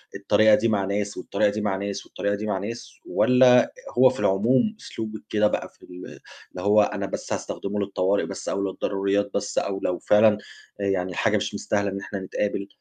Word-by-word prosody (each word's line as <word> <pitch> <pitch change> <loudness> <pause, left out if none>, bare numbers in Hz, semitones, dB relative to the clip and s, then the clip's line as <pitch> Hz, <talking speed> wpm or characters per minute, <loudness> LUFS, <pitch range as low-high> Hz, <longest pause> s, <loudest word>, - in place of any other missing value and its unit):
الطريقة 110 -1 +4
دي 115 - +1
مع 105 -3 +1
ناس، 100 +1 -2
والطريقة 100 - 0
دي 105 +1 -3
مع 100 -2 0
ناس، 100 +1 -4
والطريقة 100 0 -2
دي 105 +1 -5
مع 105 -2 -1
ناس؟ 110 +5 -6
والّا 125 -1 +4 0.2
هو 130 +1 +7
في - - -6
العموم 115 - +2
أسلوبِك 110 -1 -7
كده 105 0 +3
بقى - - -3
في - - -31
ال - - -16 0.6
اللي 90 - -7
هو 105 +2 +4
أنا 100 -1 -1
بس - - -5
هاستخدمه 100 +1 -4
للطوارئ 100 0 0
بس - - -6
أو 100 - -1
للضروريات 100 +1 -1
بس 100 0 -3
أو 95 -1 -1
لو 90 - -1
فعلًا 105 0 +4 0.4
آآ - - -1
يعني 95 -2 -1
حاجة - - +2
مش - - -3
مستاهلة 100 -1 -1
إن 100 0 -4
إحنا 100 0 -6
نتقابل، 100 +1 -3
100 Hz, 195 wpm, -24 LUFS, 100-105 Hz, 0.6 s, هو